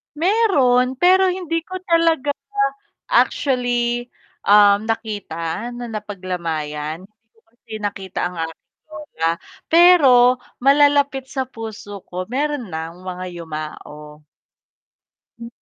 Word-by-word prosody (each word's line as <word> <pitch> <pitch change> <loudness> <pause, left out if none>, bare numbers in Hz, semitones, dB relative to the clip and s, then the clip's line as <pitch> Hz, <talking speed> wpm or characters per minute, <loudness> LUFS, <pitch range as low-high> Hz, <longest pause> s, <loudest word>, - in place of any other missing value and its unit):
Meron, 290 - +2
pero 370 +5 +4
hindi 360 -3 -1
ko 370 - -7
talaga 330 -4 +2 0.8
actually, 245 - +1 0.4
um, 205 +1 +5
nakita 210 -2 -4
na 240 -1 -7
napaglamayan, 170 -6 -4
hindi 215 +3 -23
ko 225 - -28
kasi 230 -1 -22
nakita 195 -2 -4
ang 180 - -10
aking 165 - -17
lola. 300 - -3 0.4
Pero 270 -8 +6 0.2
malalapit 280 -1 +3
sa 265 -1 -2
puso 220 -4 -8
ko, 180 +1 -4
meron 280 - -2
nang 165 +3 -6
mga 185 0 -6
yumao. 150 -2 -8 1.2
M 235 - -8
235 Hz, 105 wpm, -20 LUFS, 185-285 Hz, 1.2 s, Pero